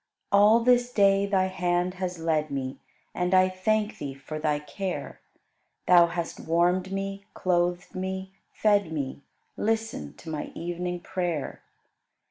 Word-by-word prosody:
All 210 +3 +6
this 245 0 +3
day 200 -2 +4
Thy 190 -2 +2
hand 180 -1 0
has 180 -1 -2
led 160 -2 0
me, 135 -1 -4 0.3
And 180 +1 +1
I 185 0 +6
thank 210 +3 0
Thee 140 -2 -5
for 145 +3 -7
Thy 150 -1 +1
care; 180 +5 -5 0.7
Thou 175 -1 +7
hast 170 -1 -4
warmed 180 +3 +1
me, 195 0 -4
clothed 175 -1 0
me, 190 0 -4 0.2
fed 205 -5 +2
me; 140 -3 -4 0.4
Listen 225 +4 -2
to - - -16
my 150 -1 -3
evening 175 +1 -3
prayer. 175 -6 -3
180 Hz, 135 wpm, -27 LUFS, 170-195 Hz, 0.7 s, Thou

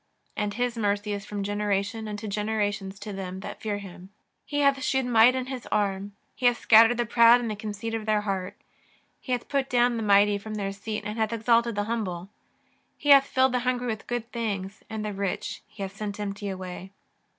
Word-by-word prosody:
And 205 -1 -2
His 245 0 -1
mercy 205 0 0
is 200 0 -6
from 205 -1 -4
generation 205 +1 -1
unto 210 +1 -5
generations 205 -1 -2
to 205 -1 -6
them 190 -1 -6
that - - -8
fear 210 -2 -2
Him. 190 -2 -10 0.4
He 290 -1 -1
hath 280 -1 +3
shewed 265 0 +1
might 240 +1 +6
in 260 -1 -2
His 260 -2 -6
arm; 200 -1 -1 0.2
He 250 - +2
hath 245 0 +3
scattered 230 +2 +6
the 240 - +1
proud 235 +1 +6
in 240 -2 -3
the 215 - -3
conceit 215 +1 -5
of 225 -1 -3
their 215 -1 +2
heart. 195 -3 -3 0.6
He 255 - -8
hath 245 -1 -1
put 275 -1 -1
down 245 -1 +3
the - - -2
mighty 205 -1 +4
from 215 +1 -7
their 200 -2 -2
seat 210 +2 -5
and 210 +2 -4
hath 220 0 +1
exalted 230 0 +2
the 205 - 0
humble. 195 -5 -3 0.7
He 290 - -3
hath 275 -1 +8
filled 260 0 +3
the 250 - +1
hungry 250 0 -1
with 220 -2 -4
good 240 0 -3
things, 200 -4 -4
and 220 -1 -4
the 210 - -3
rich 195 -2 -3
He 210 -1 -8
hath 195 0 -6
sent 205 0 -5
empty 205 0 -4
away. 185 0 -7
215 Hz, 210 wpm, -26 LUFS, 200-235 Hz, 0.7 s, hath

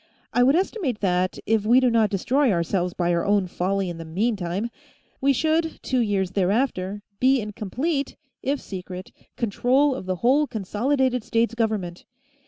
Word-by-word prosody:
I 245 - +3
would 265 +4 +5
estimate 350 - -1
that, 185 -1 +1
if 220 -1 +2
we 235 +4 +5
do 255 -2 +3
not 225 -2 +3
destroy 250 +7 +2
ourselves 175 0 0
by 175 -1 +1
our 170 - +1
own 200 -1 +2
folly 190 +2 -1
in 170 -1 -6
the - - -5
meantime, 195 +3 -2 0.5
we 275 +1 +4
should, 320 +4 0
two 255 - 0
years 200 -5 0
thereafter, 200 0 0 0.2
be 260 +1 +4
in 210 -2 -5
complete 275 - -2 0.3
if 280 +1 -1
secret 185 -1 -8 0.3
control 255 +5 +2
of 220 -8 -7
the 185 - 0
whole 285 +4 +4
Consolidated 250 +4 0
States 230 +1 +1
Government. 215 -7 -2
220 Hz, 165 wpm, -24 LUFS, 185-260 Hz, 0.5 s, would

